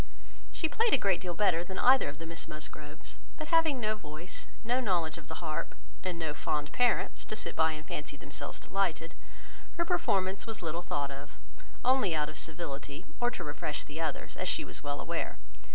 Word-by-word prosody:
She 320 - +1
played 455 +7 +3
a - - +4
great 195 -6 +3
deal 180 -2 -2
better 175 -3 +4
than 190 +2 -6
either 260 - +6
of 145 - -6
the 165 - -6
Miss 165 0 -4
Musgroves, 155 -1 -6 0.2
but 310 -1 -5
having 325 -5 +5
no 215 -2 +2
voice, 155 -2 -6 0.2
no 245 +3 +3
knowledge 175 -8 +1
of 150 - -13
the 160 +1 -5
harp, 155 -1 -2 0.3
and 180 -2 -1
no 160 -3 -1
fond 145 0 -1
parents, 245 -1 +3
to - - -3
sit - - -4
by 160 0 +4
and 155 0 -7
fancy 150 -1 -4
themselves 140 - -5
delighted, 175 -4 0 0.6
her 340 - +3
performance 190 - +2
was 220 -5 -3
little 165 +1 -1
thought 145 -5 -1
of, 140 +2 -8 0.5
only 250 -9 +5
out 150 -1 +1
of 155 - -7
civility, 150 -3 -3
or 240 - +4
to - - -4
refresh 145 0 -2
the 155 +3 -5
others, 160 - -2
as - - 0
she - - +1
was - - -5
well 145 0 -2
aware. - - -2
165 Hz, 200 wpm, -32 LUFS, 150-210 Hz, 0.6 s, either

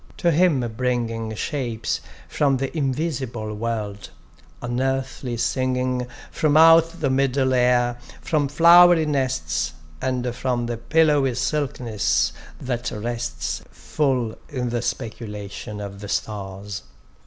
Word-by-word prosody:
to 170 - +2
him 165 -4 +3
bringing 115 -3 -1
Shapes 120 -3 -2 0.3
from 140 -2 +1
the 135 +4 -3
invisible 130 -6 -2
world, 105 -2 -4 0.5
unearthly 130 0 -2
singing 125 +1 0 0.2
from 155 -1 +2
out 165 +1 +6
the 140 -3 +1
middle 130 0 +2
air, 125 -1 +2 0.2
from 150 -4 0
flowery 170 +2 +7
nests, 80 - -1 0.3
And 125 -2 -1
from 125 -1 -1
the 120 0 -3
pillowy 145 -1 +2
silkiness 125 -4 0 0.3
that 125 -1 -3
rests 115 +2 -3
Full 130 -7 -1
in 125 -3 -2
the 120 0 -1
speculation 105 -3 -5
of 100 -1 -7
the 105 0 -8
stars. 100 -1 -4
125 Hz, 110 wpm, -23 LUFS, 115-140 Hz, 0.5 s, flowery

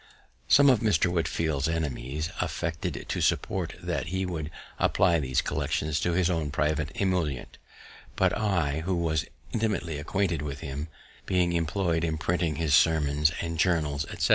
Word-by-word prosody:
_" - - -26 0.4
Some 140 0 +6
of 130 -5 +6
Mr. 90 -5 +2
Whitefield's 80 -4 0
enemies 75 -2 -2
affected 85 -1 -3
to - - -2
suppose - - +1 0.2
that - - -2
he 95 +2 -1
would 80 -4 -4 0.3
apply 85 -3 +3
these 65 -3 0
collections 75 0 -1
to 85 - 0
his 90 0 +2
own 80 -5 0
private 75 +1 0
emolument; 90 -9 -1 0.6
but - - +2
I, 85 -9 0
who 90 +3 -1
was 80 -2 0 0.3
intimately 105 -9 -1
acquainted 85 0 0
with 70 -1 -5
him 70 +3 -4 0.4
(being 90 -2 +2
employed 85 0 0
in 80 -2 0
printing 85 -1 0
his 80 -1 0
Sermons 75 -1 +4
and 85 -1 -4
Journals, 75 -5 +1
etc.) - - -1
80 Hz, 155 wpm, -28 LUFS, 75-90 Hz, 0.6 s, Some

